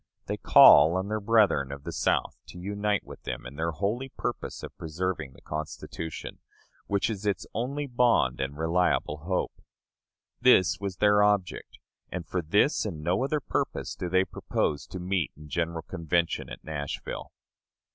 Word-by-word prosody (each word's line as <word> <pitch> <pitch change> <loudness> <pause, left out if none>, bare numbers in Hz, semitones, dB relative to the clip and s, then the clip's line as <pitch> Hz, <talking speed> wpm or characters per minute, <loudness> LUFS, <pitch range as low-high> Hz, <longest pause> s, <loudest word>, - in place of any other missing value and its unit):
They - - -3
call 85 +3 +8
on 95 +2 -3
their 110 0 -1
brethren 105 -10 +3
of 70 0 -8
the - - -5
South - - 0
to - - -11
unite 100 +2 -1
with - - -11
them - - -5
in 70 - -8
their 80 +2 -1
holy 105 - -2
purpose - - -5
of - - -8
preserving 80 -3 -3
the - - -19
Constitution, 80 +1 -6 0.5
which 100 -1 +1
is 105 -2 -4
its 100 - -1
only 140 +5 -2
bond 120 - +2
and 70 +2 -3
reliable 80 -2 +1
hope. 90 +4 -3 0.8
This 95 -7 +5
was 100 -2 -4
their 105 +1 +4
object; 105 -3 0 0.3
and 90 -1 -4
for 90 - -1
this 100 - +2
and 95 -7 -4
for 75 - -9
no 90 +8 +1
other 150 +3 0
purpose - - -2
do 90 - -4
they 95 +1 +3
propose 75 -7 -2
to - - -7
meet 90 -2 -1
in 75 0 -12
general 85 +1 -2
convention 85 +1 -1
at - - -9
Nashville. 70 -2 -5
90 Hz, 165 wpm, -28 LUFS, 80-105 Hz, 0.8 s, call